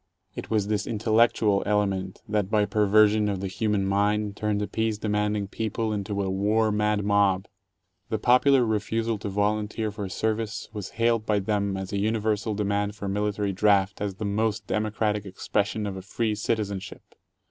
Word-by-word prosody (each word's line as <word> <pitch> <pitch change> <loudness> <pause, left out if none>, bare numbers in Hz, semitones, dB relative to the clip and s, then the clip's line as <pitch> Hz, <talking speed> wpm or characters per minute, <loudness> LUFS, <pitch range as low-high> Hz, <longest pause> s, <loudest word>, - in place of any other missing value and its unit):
It - - -7
was 110 -3 +1
this 105 0 -1
"intellectual" 110 -2 +2
element 100 -2 -1
that 105 -2 0
by 105 -1 +3
perversion 105 +1 +3
of 100 -2 -2
the 100 - -3
human 105 +1 0
mind 105 +1 +1
turned 105 -1 -1
a - - -3
peace 110 -1 -1
demanding 105 -1 -1
people 110 +1 -2
into 100 0 -2
a 95 - -2
war 105 +3 +2
mad 105 -1 +1
mob. 100 -2 +2 0.6
The 110 - 0
popular 125 +3 +4
refusal 110 +1 -1
to 100 - -4
volunteer 105 +2 -1
for 100 -2 -5
Service 110 +2 -2
was 105 -3 -5
hailed 115 -1 +1
by 105 - +2
them 100 -1 -1
as 95 +1 -6
a 100 - 0
universal 110 0 0
demand 100 0 -1
for 100 - -6
military 105 0 -1
draft 100 0 +2
as 100 -2 -2
"the 105 - -5
most 105 +1 -1
democratic 105 -1 -1
ex 95 -2 -10
pression 105 +1 0
of 100 -2 -4
a 95 - -6
free 110 +3 -1
citizenship." 105 -2 -3
105 Hz, 170 wpm, -26 LUFS, 100-110 Hz, 0.6 s, popular